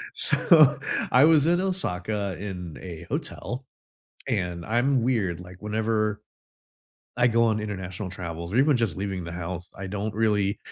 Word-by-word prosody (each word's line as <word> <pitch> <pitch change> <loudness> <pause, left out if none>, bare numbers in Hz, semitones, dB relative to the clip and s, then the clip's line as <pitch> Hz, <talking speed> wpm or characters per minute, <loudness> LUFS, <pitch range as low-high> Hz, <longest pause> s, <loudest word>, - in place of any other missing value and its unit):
So, 150 -4 +5 0.3
I 130 +3 +7
was 155 -2 +5
in 175 +1 +3
Osaka 105 - -2
in 90 -6 -6
a 85 -3 -8
hotel, 125 +2 -4 0.6
and 90 -2 -2
I'm 120 +3 +2
weird, 105 -9 0
like, 90 0 -11
whenever 110 0 0 1.0
I 125 0 +4
go 115 0 +3
on 110 -1 +2
international 95 -2 -5
travels 85 -1 -6
or 125 - +3
even 140 0 +5
just 110 -9 0
leaving 95 -2 -3
the 85 - -6
house 90 0 -5
I 95 - -6
don't 105 +2 -3
really 105 -2 +1
105 Hz, 150 wpm, -26 LUFS, 90-120 Hz, 1.0 s, I